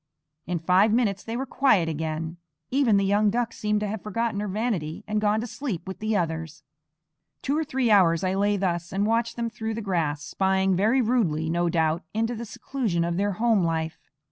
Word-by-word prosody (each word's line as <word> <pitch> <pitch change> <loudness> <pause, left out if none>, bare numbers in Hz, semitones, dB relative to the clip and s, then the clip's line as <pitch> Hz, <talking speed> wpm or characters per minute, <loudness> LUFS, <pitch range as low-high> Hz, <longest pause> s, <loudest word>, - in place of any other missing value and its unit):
In 175 0 -1
five 185 +6 +3
minutes 215 -4 +1
they 225 +1 -4
were 265 - -2
quiet 255 -10 +3
again; 160 +1 -3 0.3
even 255 -6 +3
the 195 - +2
young 205 +2 +3
duck 235 +2 -1
seemed 210 0 -1
to 210 - -1
have 210 0 -4
forgotten 215 0 -2
her 210 - -2
vanity 195 -5 -2
and 210 0 0
gone 210 +1 +2
to - - -3
sleep 225 - -5
with 190 - -6
the 215 0 0
others. 160 -3 -3 0.8
Two 280 - 0
or 320 - +1
three 260 -5 0
hours 175 -5 +5
I 185 0 +1
lay 205 +1 +1
thus 175 -2 -2
and 195 +2 0
watched 230 +1 0
them 235 -1 -2
through 220 0 -4
the 225 - -4
grass, 160 -7 -1
spying 190 +2 +1
very 220 +8 +3
rudely, 165 -10 +1
no 175 0 +1
doubt, 160 0 +1
into 225 +2 0
the 235 0 -5
seclusion 215 -5 -2
of 170 0 -1
their 200 +1 +1
home 220 -1 +2
life. 160 -1 -2
200 Hz, 205 wpm, -25 LUFS, 170-225 Hz, 0.8 s, hours